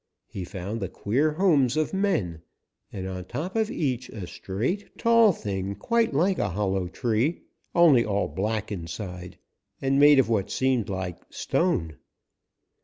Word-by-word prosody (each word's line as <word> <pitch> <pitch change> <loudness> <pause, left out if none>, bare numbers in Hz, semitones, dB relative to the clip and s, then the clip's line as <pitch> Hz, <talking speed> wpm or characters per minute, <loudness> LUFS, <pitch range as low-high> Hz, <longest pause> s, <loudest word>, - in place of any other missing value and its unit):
He 95 - -7
found 95 +5 -5
the 95 - -3
queer 140 +9 0
homes 155 -7 +3
of 155 +3 0
men 165 - 0 0.5
and 95 -1 -5
on 90 -1 -5
top 150 - -5
of 220 -1 +1
each 130 - -2
a 100 -5 -7
straight, 120 - -4
tall 230 -2 +5
thing 100 - -4
quite 230 - +1
like 180 +7 +1
a 100 - 0
hollow 95 0 -1
tree, 120 - -1 0.3
only 160 -9 +6
all 100 -2 0
black 105 +2 -2
inside 90 -1 -6 0.4
and 135 +1 +1
made 145 0 +7
of 135 - +4
what 110 -4 0
seemed 130 -5 0
like 95 -2 -4
stone. 80 - -1
115 Hz, 150 wpm, -26 LUFS, 95-155 Hz, 0.5 s, made